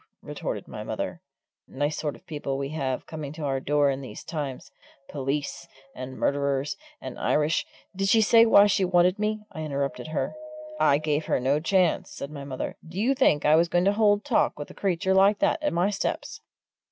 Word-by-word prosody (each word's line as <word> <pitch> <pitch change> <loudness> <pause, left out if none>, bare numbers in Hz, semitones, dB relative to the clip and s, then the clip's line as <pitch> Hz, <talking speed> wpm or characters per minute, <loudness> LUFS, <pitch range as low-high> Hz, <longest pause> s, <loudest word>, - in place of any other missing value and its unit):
retorted - - -5
my - - -7
mother. - - -4 0.5
"Nice 145 +3 -2
sort 150 -2 -3
of - - -19
people 145 -4 -4
we 140 0 -3
have 135 -4 -3
coming 155 -3 -6
to 155 -1 -7
our 135 -2 0
door 145 +1 +2
in 135 0 -4
these 130 - -9
times! 140 -4 -5 0.4
Police, 135 0 -3 0.3
and 130 0 -7
murderers, 140 0 0 0.2
and - - -8
Irish 150 +2 +1
" - - -32
"Did 195 +1 0
she 225 - +5
say 230 +1 +6
why 205 -2 +7
she 200 -1 +2
wanted 180 +2 +3
me?" 215 0 -1
I 160 - -7
interrupted 140 -2 -3
her. 155 - -2 0.5
"I 140 - +4
gave 155 0 -1
her - - +1
no 135 +4 +1
chance," 180 +1 +1
said 140 - -7
my 145 -2 -7
mother. 135 -2 -5
"Do 170 +3 -7
you 245 +6 +3
think 205 - +2
I 150 +1 +6
was 165 +1 +3
going 175 +1 +2
to 200 - +4
hold 205 0 +3
talk 260 -6 +1
with 145 - -7
a - - -12
creature 190 -1 0
like 195 +2 +5
that 320 - +1
at 300 - 0
my 180 +4 +1
steps?" 200 - -3
155 Hz, 200 wpm, -26 LUFS, 140-195 Hz, 0.5 s, why